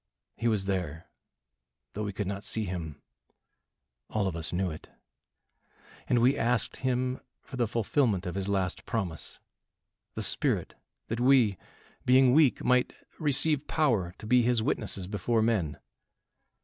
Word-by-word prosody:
He 120 - -1
was 105 -4 +1
there, 90 -5 -3 0.9
though 105 - -4
we 105 - -3
could 105 +1 -3
not 100 +1 -4
see 110 -1 -2
him. 85 -6 -5 1.1
All 105 -3 0
of 90 - -3
us 85 -1 -3
knew 90 0 -1
it; 80 - -10 1.2
and 125 - +2
we 125 +4 +4
asked 120 -3 0
him 130 0 -1 0.2
for 135 - -10
the 120 -2 +1
fulfilment 115 -3 0
of 90 - -3
his 95 0 -3
last 95 -2 -1
promise 95 -9 -4 0.8
the - - -3
Spirit, - - 0 0.4
that 115 - -2
we 125 -5 +4 0.5
being 130 0 +5
weak, 150 -3 +4
might 125 0 +2 0.3
receive 150 -1 +2
power 110 - +1
to - - -10
be 125 +3 +4
his 120 -1 +2
witnesses 100 -4 -1
before 110 +3 0
men. 95 -11 0
110 Hz, 145 wpm, -29 LUFS, 95-125 Hz, 1.2 s, being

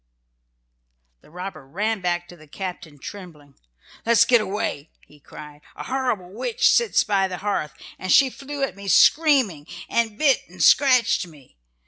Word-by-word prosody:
The - - -21
robber 180 -1 -8
ran 205 +9 -3
back 175 -1 -2
to 175 - -12
his 155 -2 -18
captain 175 -6 -7
trembling. 150 -4 -11 0.5
"Let 235 - +2
us 230 0 +5
get 240 -1 +4
away!" 190 -7 -4 0.2
he 150 - -21
cried. 150 +1 -13
"A - - -8
horrible 250 -9 -3
witch 465 - 0
sits 470 -3 +2
by 195 -2 +1
the 185 -1 -6
hearth, 180 -7 -3 0.3
and 185 - -3
she 270 -2 +5
flew 280 +1 -6
at 270 - -2
me 200 0 -10
screaming, 255 - +3 0.2
and 225 -2 -1
bit 280 -2 +3
and - - -4
scratched 250 -9 +4
me. 145 -6 -19
195 Hz, 160 wpm, -22 LUFS, 170-245 Hz, 0.5 s, us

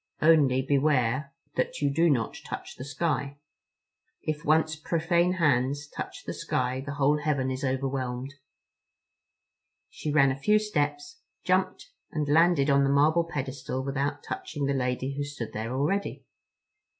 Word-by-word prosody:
Only 145 -5 +4
beware 140 -1 +1 0.3
that 130 - -1
you 145 -1 +1
do 165 +3 +4
not 120 -7 0
touch - - -7
the - - -8
sky. 140 0 -2 0.9
If 155 -1 -3
once 160 +1 +2
profane 170 +3 +1
hands 145 -4 +1
touch - - -7
the - - -4
sky 130 +1 -1
the 140 0 -5
whole 145 +1 +3
heaven 140 -3 0
is 130 +2 -4
overwhelmed." 130 0 -2 1.6
She 150 - -4
ran 140 -2 +5
a 130 - -4
few 210 +8 +4
steps, 215 - -2 0.3
jumped, - - 0 0.2
and 150 -3 -2
landed 160 -1 +4
on 140 -1 +4
the 135 - +2
marble 155 +4 +4
pedestal 130 -1 -3
without 140 +1 -2
touching 145 -2 -4
the 140 - +1
lady 130 +1 -1
who 145 - -2
stood 145 -6 -6
there 110 +2 -4
already. 150 +10 -1
140 Hz, 145 wpm, -27 LUFS, 130-155 Hz, 1.6 s, ran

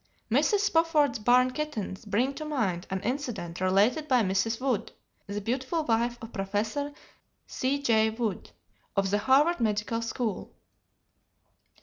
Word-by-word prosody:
Mrs. 415 -2 +3
Spofford's 325 - +2
"barn 250 +3 +4
kittens" 250 -8 -4
bring 230 +7 +1
to 310 - -6
mind 220 - -2
an 190 0 -2
incident 230 - -4
related 205 +11 +2
by 255 -5 +4
Mrs. 195 +4 0
Wood, 255 -5 -1 0.4
the 200 +1 -3
beautiful 260 - -1
wife 235 -1 +1
of 225 - -9
Professor 215 +8 -2 0.5
C.G. 255 -5 +1
Wood, 220 -2 -3 0.5
of 195 -1 +1
the 205 - +2
Harvard 280 +9 +3
Medical 220 0 0
School. 230 -2 -3
230 Hz, 125 wpm, -28 LUFS, 205-275 Hz, 0.5 s, barn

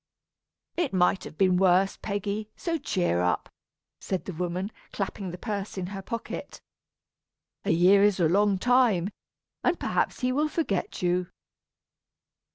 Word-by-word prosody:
"It 340 - 0
might 185 0 +2
have 155 - -10
been 185 -2 +4
worse, 190 +1 +4
Peggy, 205 +1 -3
so 330 -2 -2
cheer 180 - 0
up," 90 -3 0 0.5
said 190 -2 -3
the 190 - -5
woman, 180 +4 -3 0.2
clapping 195 -1 -4
the 175 - -6
purse 205 -1 -4
in 185 - -2
her 195 - -5
pocket. 230 +4 -6 1.1
"A - - -1
year 180 +4 +5
is 205 -2 +4
a 170 - +4
long 200 +3 +3
time, 225 -5 +3 0.5
and 355 -1 +2
perhaps - - -1
he 250 0 +1
will 300 +4 +1
forget 255 - -2
you." 180 0 +1
195 Hz, 145 wpm, -27 LUFS, 180-215 Hz, 1.1 s, year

